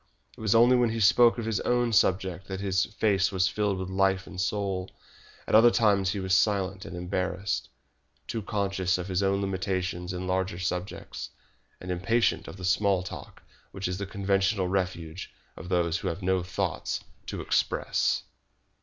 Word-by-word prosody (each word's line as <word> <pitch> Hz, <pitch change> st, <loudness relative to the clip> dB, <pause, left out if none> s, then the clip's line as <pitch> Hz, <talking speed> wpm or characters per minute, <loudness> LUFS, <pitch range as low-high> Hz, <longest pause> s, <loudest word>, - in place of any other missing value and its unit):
It -, -, -13 dB
was 110 Hz, 0 st, +2 dB
only 120 Hz, +2 st, +6 dB
when 120 Hz, -2 st, +3 dB
he 115 Hz, 0 st, -2 dB
spoke 115 Hz, +4 st, +5 dB
of 115 Hz, -, -3 dB
his 110 Hz, -3 st, 0 dB
own 120 Hz, -1 st, +1 dB
subject 95 Hz, -2 st, +1 dB
that 95 Hz, -1 st, -5 dB
his 95 Hz, -1 st, +1 dB
face 100 Hz, -3 st, +1 dB
was 95 Hz, -1 st, +2 dB
filled 105 Hz, -1 st, 0 dB
with 95 Hz, 0 st, -4 dB
life 95 Hz, 0 st, +2 dB
and 90 Hz, -, -5 dB
soul. 95 Hz, -2 st, -2 dB, 0.6 s
At -, -, -5 dB
other 115 Hz, +2 st, +8 dB
times 100 Hz, -5 st, +3 dB
he 100 Hz, +1 st, -2 dB
was 95 Hz, -1 st, -1 dB
silent 95 Hz, -1 st, +1 dB
and 90 Hz, -, -7 dB
embarrassed, 95 Hz, +2 st, -2 dB, 0.6 s
too 115 Hz, -, -3 dB
conscious 100 Hz, -3 st, 0 dB
of 90 Hz, 0 st, -5 dB
his 95 Hz, 0 st, 0 dB
own 100 Hz, 0 st, +1 dB
limitations 95 Hz, -2 st, -2 dB
in 90 Hz, 0 st, -4 dB
larger 95 Hz, -1 st, -1 dB
subjects, 90 Hz, +1 st, -4 dB, 0.5 s
and 90 Hz, -, -6 dB
impatient 115 Hz, +7 st, +1 dB
of -, -, -9 dB
that 90 Hz, -, -6 dB
small 95 Hz, 0 st, +2 dB
talk 90 Hz, -, -9 dB, 0.3 s
which 95 Hz, -1 st, -4 dB
is 90 Hz, +1 st, -3 dB
the 100 Hz, -, -4 dB
conventional 100 Hz, -1 st, +1 dB
refuge 90 Hz, -2 st, -3 dB, 0.2 s
of 90 Hz, -, -9 dB
those 85 Hz, -2 st, +1 dB
who -, -, -4 dB
have 90 Hz, +3 st, -3 dB
no 95 Hz, 0 st, +2 dB
thoughts 90 Hz, +1 st, -2 dB, 0.3 s
to -, -, -4 dB
express. -, -, 0 dB
95 Hz, 175 wpm, -28 LUFS, 90-100 Hz, 0.6 s, other